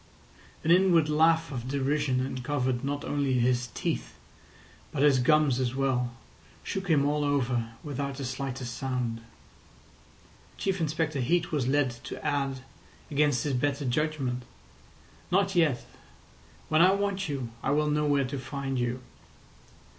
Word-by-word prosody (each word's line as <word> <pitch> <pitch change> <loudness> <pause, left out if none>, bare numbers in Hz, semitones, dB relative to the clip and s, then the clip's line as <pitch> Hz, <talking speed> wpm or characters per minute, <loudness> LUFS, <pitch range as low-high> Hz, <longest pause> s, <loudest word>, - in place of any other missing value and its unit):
An 160 - +2
inward 175 -4 +5
laugh 160 +1 +3
of 125 -2 -5
derision 140 -1 0
uncovered 130 -1 -2
not 145 +1 -2
only 140 -2 0
his 125 0 +2
teeth - - -3 0.7
but 135 - 0
his 140 -3 +5
gums 140 0 +3
as 130 -1 -1
well, 125 -3 0 0.5
shook 195 0 -4
him 150 -5 +3
all 150 +1 +1
over, 125 -5 0
without 140 -1 -3
the 140 - -4
slightest 130 -1 -4
sound. 125 -4 -2 1.4
Chief 195 -2 -1
Inspector 155 -1 -1
Heat 170 +7 +1
was 140 -6 0
led 140 -1 +2
to - - -6
add, 135 -2 -1 0.5
against 145 -4 +2
his 145 - -1
better 140 +2 0
judgment: 130 -2 -1 0.9
"Not 195 +1 +2
yet. 155 -8 +2 0.8
When 155 +1 +3
I 185 +2 +6
want 200 -2 -1
you 130 -5 -3
I - - -1
will 150 +2 +2
know 150 0 +1
where 140 -2 +2
to 130 +2 -4
find 135 0 -3
you." 120 +1 -1
140 Hz, 140 wpm, -28 LUFS, 130-150 Hz, 1.4 s, I